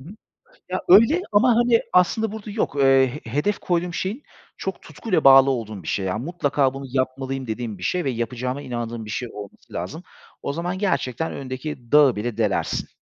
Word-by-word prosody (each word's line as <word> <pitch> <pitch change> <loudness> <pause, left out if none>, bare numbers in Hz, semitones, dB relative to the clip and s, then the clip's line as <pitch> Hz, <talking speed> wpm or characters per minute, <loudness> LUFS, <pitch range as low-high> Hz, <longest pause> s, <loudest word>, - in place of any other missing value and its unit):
Hı 135 - -12
hı. 195 - -10 0.6
Ya, 185 0 -2
öyle 230 - +7
ama 225 +3 +4
hani, 240 0 +4
aslında 210 +4 +3
burada 215 -1 -7
yok, 205 -8 -2
eee, 135 -1 +5 0.2
he 115 - -9
hedef 150 - 0
koyduğum 175 0 -1
şeyin 205 - -3 0.3
çok - - -5
tutkuyla 185 -9 -2
bağlı 135 0 +8
olduğum 110 -6 -4
bir - - -11
şey, 95 - -1
yani, 105 +5 -2
"Mutlaka 145 -5 0
bunu 135 0 -7
yapmalıyım." 130 0 -2
dediğim 110 -2 -4
bir 90 - -10
şey 180 - 0
ve 135 - -1
yapacağıma 125 +3 -3
inandığım 120 -3 -5
bir - - -10
şey 120 +4 -4
olması 100 -1 -11
lazım. 95 - -5 0.4
O 140 - -3
zaman 175 +3 -3
gerçekten 160 - -1
önündeki 130 -2 -7
dağı 145 -4 +6
bile 110 +1 -4
delersin. 105 -4 -1
135 Hz, 190 wpm, -23 LUFS, 120-180 Hz, 0.6 s, bağlı